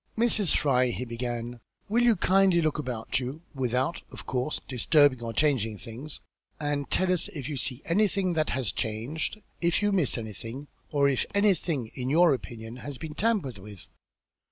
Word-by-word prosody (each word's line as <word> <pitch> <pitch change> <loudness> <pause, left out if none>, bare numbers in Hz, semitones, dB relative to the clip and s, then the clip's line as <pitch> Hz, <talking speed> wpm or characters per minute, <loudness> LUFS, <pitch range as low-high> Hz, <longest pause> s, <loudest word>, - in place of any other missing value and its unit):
"Mrs. 220 -6 +4
Fry," 130 -3 +3
he 125 +1 -3
began, 120 0 -4 0.3
"will 230 +4 +2
you 240 -2 +5
kindly 190 -1 +4
look 155 -2 0
about 125 -4 -2
you, 135 +6 -6
without, 130 +3 -1
of - - -9
course, 130 +4 -1
disturbing 140 0 +3
or 115 -1 -3
changing 115 -4 +1
things, 125 +9 -7 0.4
and 145 -2 -2
tell 185 -1 +2
us 175 - +3
if 140 -5 -6
you 150 - -3
see 125 +1 -2
anything 190 0 +2
that 155 -2 +1
has 130 -5 0
changed? 120 - -3 0.2
If 170 +3 +2
you 205 - +3
miss 180 -11 +2
anything, 115 +5 -7 0.2
or 140 -1 +3
if 135 -3 +1
anything 175 - +1
in 125 0 -3
your 165 +1 +5
opinion, 115 -2 -6
has 140 +1 -6
been 155 +1 -7
tampered 185 - 0
with? 100 -1 -10
140 Hz, 170 wpm, -28 LUFS, 120-170 Hz, 0.4 s, you